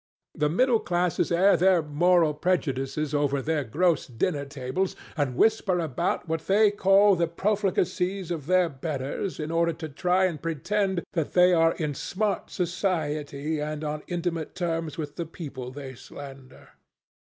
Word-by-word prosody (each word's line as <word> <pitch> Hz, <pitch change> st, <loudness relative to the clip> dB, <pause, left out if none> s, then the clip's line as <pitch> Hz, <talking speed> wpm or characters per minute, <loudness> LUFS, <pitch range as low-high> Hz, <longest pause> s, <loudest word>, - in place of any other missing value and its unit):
The 150 Hz, -1 st, 0 dB
middle 235 Hz, -, +3 dB
classes 175 Hz, -2 st, 0 dB
air 185 Hz, +4 st, +5 dB
their 185 Hz, -2 st, +4 dB
moral 165 Hz, +1 st, +3 dB
prejudices 150 Hz, -3 st, -1 dB
over 145 Hz, -1 st, +1 dB
their 150 Hz, +1 st, -1 dB
gross 165 Hz, +7 st, +1 dB
dinner 140 Hz, +4 st, -1 dB
tables, 140 Hz, +7 st, -3 dB, 0.2 s
and 140 Hz, -5 st, -1 dB
whisper 195 Hz, -, +2 dB
about 170 Hz, +2 st, -1 dB
what 160 Hz, 0 st, -3 dB
they 205 Hz, +1 st, +5 dB
call 200 Hz, 0 st, +5 dB
the 170 Hz, -1 st, +1 dB
profligacies 185 Hz, -1 st, -1 dB
of 155 Hz, -5 st, -4 dB
their 185 Hz, -1 st, +4 dB
betters 140 Hz, +4 st, -4 dB
in 155 Hz, +1 st, -3 dB
order 170 Hz, 0 st, +2 dB
to 160 Hz, 0 st, -7 dB
try 180 Hz, +6 st, +2 dB
and 165 Hz, -6 st, -2 dB
pretend 190 Hz, +4 st, -1 dB
that 165 Hz, -4 st, -2 dB
they 180 Hz, 0 st, +6 dB
are 165 Hz, -1 st, +4 dB
in 155 Hz, -3 st, -2 dB
smart 200 Hz, +8 st, -2 dB
society 155 Hz, -4 st, -2 dB
and 150 Hz, +1 st, -4 dB
on 150 Hz, 0 st, -3 dB
intimate 170 Hz, -3 st, -3 dB
terms 165 Hz, -3 st, -2 dB
with 150 Hz, -3 st, -6 dB
the 170 Hz, -, -2 dB
people 140 Hz, -7 st, -7 dB
they 135 Hz, 0 st, -8 dB
slander. 135 Hz, 0 st, -12 dB
165 Hz, 150 wpm, -26 LUFS, 145-180 Hz, 0.2 s, they